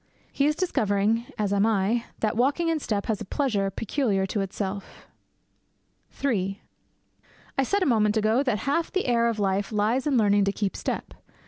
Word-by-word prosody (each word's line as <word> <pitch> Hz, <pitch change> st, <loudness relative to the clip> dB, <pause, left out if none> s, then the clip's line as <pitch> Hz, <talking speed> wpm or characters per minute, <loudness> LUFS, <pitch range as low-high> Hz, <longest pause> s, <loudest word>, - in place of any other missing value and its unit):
He 280 Hz, -, +2 dB
is 300 Hz, -, +1 dB
discovering, 225 Hz, -, +1 dB
as 205 Hz, -2 st, 0 dB
I -, -, +2 dB
am, 215 Hz, +2 st, +2 dB, 0.2 s
that 215 Hz, -1 st, 0 dB
walking 280 Hz, +8 st, +1 dB
in 325 Hz, -1 st, +1 dB
step 210 Hz, -7 st, -2 dB
has 220 Hz, -2 st, -2 dB
a -, -, -4 dB
pleasure 210 Hz, -5 st, 0 dB
peculiar 205 Hz, -1 st, 0 dB
to 200 Hz, +2 st, -2 dB
itself. 195 Hz, 0 st, -5 dB, 1.2 s
III 195 Hz, -6 st, 0 dB, 1.0 s
I -, -, +2 dB
said 395 Hz, +8 st, +1 dB
a -, -, +1 dB
moment 215 Hz, -4 st, +3 dB
ago 220 Hz, +4 st, +3 dB
that 255 Hz, -6 st, 0 dB
half 320 Hz, +4 st, 0 dB
the 380 Hz, -, 0 dB
air 235 Hz, -1 st, +2 dB
of 230 Hz, -, -2 dB
life 200 Hz, 0 st, 0 dB
lies 220 Hz, +7 st, +1 dB
in 275 Hz, -3 st, +2 dB
learning 205 Hz, -2 st, +4 dB
to 200 Hz, -, +1 dB
keep 200 Hz, -1 st, -2 dB
step. -, -, -4 dB
220 Hz, 180 wpm, -26 LUFS, 200-265 Hz, 1.2 s, learning